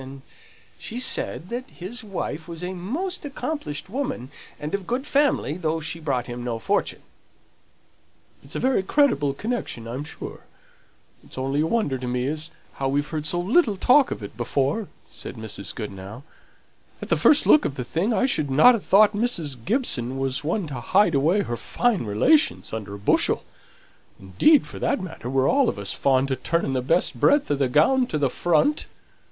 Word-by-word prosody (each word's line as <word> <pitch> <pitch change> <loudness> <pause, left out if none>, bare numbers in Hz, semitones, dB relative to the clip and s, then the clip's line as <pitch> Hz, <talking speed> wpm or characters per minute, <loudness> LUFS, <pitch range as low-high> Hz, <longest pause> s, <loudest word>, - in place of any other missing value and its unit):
And 135 0 -10 0.6
she 235 - -6
said 185 -7 -1
that 250 +2 -5
his 225 +8 -8
wife 175 -6 -5
was 170 0 -8
a 180 +1 -3
most 295 - -4
accomplished 285 - -4
woman, 200 - -4 0.3
and 150 +1 -5
of 200 -2 -3
good 255 +3 -2
family, 275 - +1
though 165 -2 -1
she 160 +1 -5
brought 135 -6 -1
him 120 0 -6
no 120 -2 -2
fortune." 200 - -1 1.4
"It's - - -10
a - - -1
very 260 -5 +2
creditable 190 - +2
connection, 215 - -4
I'm 125 +5 -4
sure; 150 - -8 0.8
it's - - -13
only 135 +3 0
a 160 - +1
wonder 165 - 0
to 125 - -5
me 125 0 -1
as 155 +3 -2 0.3
how 135 - -1
we've 145 +2 0
heard 155 -1 -3
so 175 - -1
little 215 - +2
talk 260 +7 +5
of - - -5
it 100 - -8
before," 140 - -1 0.2
said - - -9
Mrs. 110 -3 -6
Goodenough. 105 +2 -7 0.8
"At - - -8
the - - +4
first 300 - +5
look 305 - +6
of 135 - -2
the 125 - -4
thing, 170 - -1
I 235 - +2
shouldn't 150 - 0
ha' 245 +5 +7
thought 210 +3 +5
Mrs. 205 - -1
Gibson 135 - 0
was 135 0 -2
one 170 +5 -1
to 130 -4 -5
hide 190 - +3
away 165 +9 +2
her 120 - -4
fine 220 - 0
relations 290 - +2
under 105 -2 -5
a - - -7
bushel; 100 - +2 0.8
indeed, 255 - +3
for - - -9
that - - 0
matter, 175 -9 -7
we're 135 0 +2
all 275 -2 +3
of - - -4
us 100 -1 -4
fond 135 0 +1
o' - - +2
turning 170 -3 0
the 130 - 0
best 165 +8 +1
breadth 285 - +3
o' - - +3
the 135 -2 0
gown 245 - +3
to 155 - -2
the 140 -4 +1
front. 175 - +1
160 Hz, 185 wpm, -24 LUFS, -, 1.4 s, ha